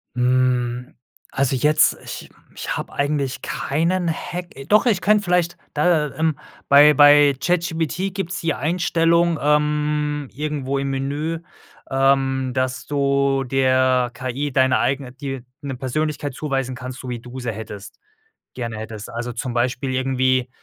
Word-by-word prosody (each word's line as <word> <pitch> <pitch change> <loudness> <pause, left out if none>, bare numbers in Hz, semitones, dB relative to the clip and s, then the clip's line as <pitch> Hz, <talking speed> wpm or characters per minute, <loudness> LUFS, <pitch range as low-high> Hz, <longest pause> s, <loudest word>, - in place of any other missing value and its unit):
Hm, 125 0 +1 0.4
also 135 0 0
jetzt 150 +4 +3
ich - - -8 0.2
ich - - -4
habe - - -5
eigentlich 140 -2 -1
keinen 165 +5 -1
Hack. 175 +2 -5 0.2
Doch, 210 +6 +4
ich 220 -6 +3
könnte 210 +2 +3
vielleicht 180 -2 +1 0.2
da, 150 -1 +2
ähm 160 -2 0 0.3
bei 145 +2 +7
bei 145 0 +7
ChatGPT 175 +1 -1
gibt's 185 -2 -4
die 165 -1 0
Einstellung, 170 +1 +1
ähm, 150 0 +1
irgendwo 140 -2 -2
im 140 0 -2
Menü, 145 +5 -2 0.5
ähm, 135 -1 +2
dass 130 0 -2
du 140 -1 +1
der 130 -1 +2
KI 130 +3 -3
deine 130 -1 +3
eigene 135 -2 -1
dir 135 -2 -6 0.2
'ne 135 -2 -4
Persönlichkeit 145 +2 -2
zuweisen 135 -4 -2
kannst, 130 +1 -7
so 130 - -8
wie 120 -1 -4
du 125 +2 -9
sie 120 -2 -3
hättest 105 -2 -9 0.6
gerne 115 -3 -4
hättest. 110 -1 -7
Also, 120 +1 -4
zum 120 +1 -4
Beispiel 125 +2 -1
irgendwie: 130 -1 +1
140 Hz, 140 wpm, -21 LUFS, 130-150 Hz, 0.6 s, bei